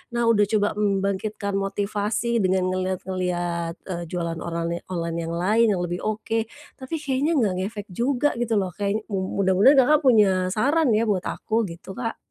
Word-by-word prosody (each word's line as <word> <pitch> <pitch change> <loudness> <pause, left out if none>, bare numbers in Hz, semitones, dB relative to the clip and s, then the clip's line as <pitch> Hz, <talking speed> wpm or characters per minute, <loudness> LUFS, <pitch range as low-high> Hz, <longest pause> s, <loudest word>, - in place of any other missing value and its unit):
Nah, 235 - +1
udah 210 -2 +4
coba 205 0 +1
membangkitkan 200 +1 -1
motivasi 205 +4 -1
dengan 185 -1 +1
ngelihat-ngelihat, 180 -2 -2
eee, 175 -2 -5
jualan 170 -1 -3
orale 170 0 -4
online 170 -2 -3
yang 165 - -4
lain 215 +6 +3
yang 175 - -2
lebih 175 0 -3
oke, 220 +1 -2 0.3
tapi 260 +5 -5
kayaknya 280 +4 0
nggak 215 -9 +2
ngefek 205 +2 -4
juga 250 +8 +1
gitu 235 -2 0
loh, 190 -3 0
kayak, 205 +3 -2
mu 195 0 -1
mudah-mudahan 195 +9 +5
Kakak 300 +4 +4
punya 195 -6 +4
saran 290 +8 +2
ya 220 - +2
buat 200 -5 0
aku, 220 -1 -1
gitu, 170 +3 -9
Kak. 230 -2 -3
200 Hz, 165 wpm, -24 LUFS, 185-225 Hz, 0.3 s, mudah-mudahan